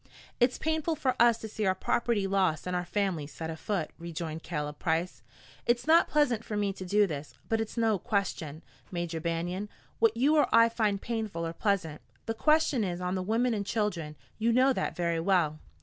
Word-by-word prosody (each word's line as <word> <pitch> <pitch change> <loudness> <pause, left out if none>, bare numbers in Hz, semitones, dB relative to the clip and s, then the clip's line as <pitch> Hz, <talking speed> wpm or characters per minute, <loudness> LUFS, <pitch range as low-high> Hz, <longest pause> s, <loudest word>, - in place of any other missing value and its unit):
"It's 245 +1 +3
painful 315 +1 0
for 265 -4 0
us 235 -1 +6
to 225 - -7
see 215 0 -4
our 190 - +2
property 220 +1 0
lost 190 -5 +1
and 180 0 -2
our 180 0 -1
families 175 -6 -1
set 160 +2 -5
afoot," 160 +1 -3
rejoined 165 -1 -5
Caleb 150 -3 -4
Price. 165 +1 -1 0.5
"It's 240 0 +2
not 325 +2 +5
pleasant 250 -7 +2
for 210 - -4
me 200 -1 0
to 190 - -8
do 205 +3 +3
this. 150 -5 -6
But 225 0 +1
it's 225 +2 -5
no 225 -4 +2
question, 180 -8 -2 0.3
Major 170 -2 -3
Banion, 175 +5 -2 0.3
what 225 0 +3
you 290 +6 +4
or 295 - +4
I 230 0 +6
find 215 -3 0
painful 215 -7 -3
or 165 - -4
pleasant. 180 -6 -1 0.2
The 225 - -1
question 305 0 +3
is 180 -3 -2
on 180 0 -2
the 185 - -1
women 230 +5 +1
and 205 -2 -1
children. 200 -8 -2 0.2
You 230 +2 +2
know 260 +3 +4
that - - -2
very 170 -1 0
well." 165 -4 +1
200 Hz, 195 wpm, -29 LUFS, 170-230 Hz, 0.5 s, us